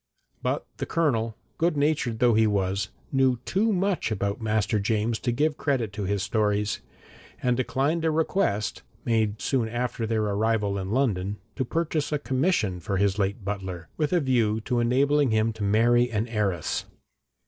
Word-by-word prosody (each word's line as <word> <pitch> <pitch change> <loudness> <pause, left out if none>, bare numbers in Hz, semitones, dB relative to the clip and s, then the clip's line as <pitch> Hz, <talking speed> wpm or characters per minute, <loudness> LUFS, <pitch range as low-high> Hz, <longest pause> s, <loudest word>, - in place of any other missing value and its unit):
But - - -1
the - - -4
Colonel, 115 -9 0 0.2
good 165 -2 +2
natured 140 -6 +1
though 120 0 +4
he 110 0 +4
was, 100 -1 0 0.2
knew 130 -2 +3
too 215 +4 +1
much 190 - 0
about 100 +1 -2
master 110 0 +1
James 110 +2 0
to 120 - -1
give 150 +5 +1
credit 125 -8 0
to 100 -1 -3
his 100 0 0
stories, 105 0 0 0.6
and 125 -1 +3
declined 140 +6 0
a 160 - +3
request, 155 - 0 0.2
made 110 -3 +1
soon 120 -5 +1
after 120 -1 -2
their 110 -1 +1
arrival 105 -1 0
in 95 0 -4
London, 105 -5 0 0.2
to 130 - 0
purchase 155 +1 -1
a 150 - +2
commission 130 - 0
for 95 +3 -2
his 100 +1 +1
late 100 +1 -1
butler, 95 -4 -4
with 150 -2 0
a 180 - +4
view 120 -7 +2
to 120 +2 -1
enabling 140 +4 +3
him 110 0 +2
to 110 - -6
marry 120 +4 +4
an 110 0 -1
heiress. 100 -8 -1
115 Hz, 170 wpm, -26 LUFS, 105-135 Hz, 0.6 s, though